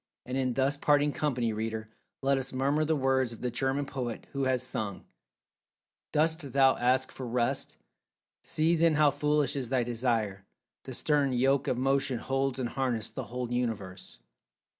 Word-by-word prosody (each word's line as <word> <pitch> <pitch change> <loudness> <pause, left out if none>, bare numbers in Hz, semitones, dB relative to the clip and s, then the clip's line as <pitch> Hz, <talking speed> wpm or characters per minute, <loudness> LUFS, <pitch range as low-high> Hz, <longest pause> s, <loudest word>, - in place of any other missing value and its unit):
And 125 - -4
in 130 -2 0
thus 135 +2 +1
parting 145 0 +3
company, 125 -6 0
reader, 110 0 -4 0.3
let 135 0 +3
us 135 0 -3
murmur 140 +4 +1
the 155 +1 +1
words 130 -3 +1
of 115 - -12
the 125 - -1
German 135 +3 0
poet, 125 -4 -5
who 140 -1 -1
has 130 -1 +1
sung: 105 -6 -4 1.1
"Dost 155 -2 0
thou 135 -1 +5
ask 130 +2 +2
for 130 - -7
rest? 120 0 0 0.7
See 165 +1 +2
then 165 -1 +3
how 150 -1 +5
foolish 150 0 +1
is 130 -4 -3
thy 130 -2 +2
desire; 115 -5 -1 0.4
the - - -5
stern 145 -3 +1
yoke 135 +3 +2
of 125 - 0
motion 135 0 +1
holds 135 +2 -1
in 130 - -1
harness 120 -3 -1
the - - -5
whole 125 0 -5
Universe. 105 -6 -3
130 Hz, 165 wpm, -29 LUFS, 120-140 Hz, 1.1 s, thou